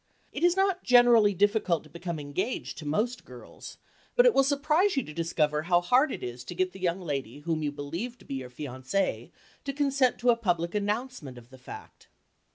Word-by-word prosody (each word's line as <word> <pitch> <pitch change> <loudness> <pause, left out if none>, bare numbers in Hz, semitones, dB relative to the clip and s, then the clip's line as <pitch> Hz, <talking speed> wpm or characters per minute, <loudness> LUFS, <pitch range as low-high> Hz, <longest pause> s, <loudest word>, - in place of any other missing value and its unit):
It - - -4
is 350 +1 +4
not 385 -1 +2
generally 240 -5 +5
difficult 205 -4 +1
to 155 - -17
become 170 0 -5
engaged 165 - -4
to 155 - -7
most 230 +11 -1
girls, 125 -1 -12 0.4
but - - +6
it - - +6
will 270 - +4
surprise 305 +6 +2
you 270 - +2
to 150 - -10
discover 150 -2 0
how 175 +1 +3
hard 250 - +3
it - - -6
is 120 0 -6
to 175 - -7
get 185 +1 0
the 190 - -12
young 180 0 0
lady 140 -5 -4
whom 160 0 -2
you 150 -1 -1
believe 165 +13 -5
to - - -19
be - - -6
your 130 -2 -5
fiancée 130 +8 -3 0.3
to 275 - -4
consent 275 -3 +1
to 245 0 +3
a - - +3
public 175 -7 -1
announcement 210 - -3
of 120 +1 -15
the 130 - -14
fact. - - -12
185 Hz, 205 wpm, -28 LUFS, 150-250 Hz, 0.4 s, but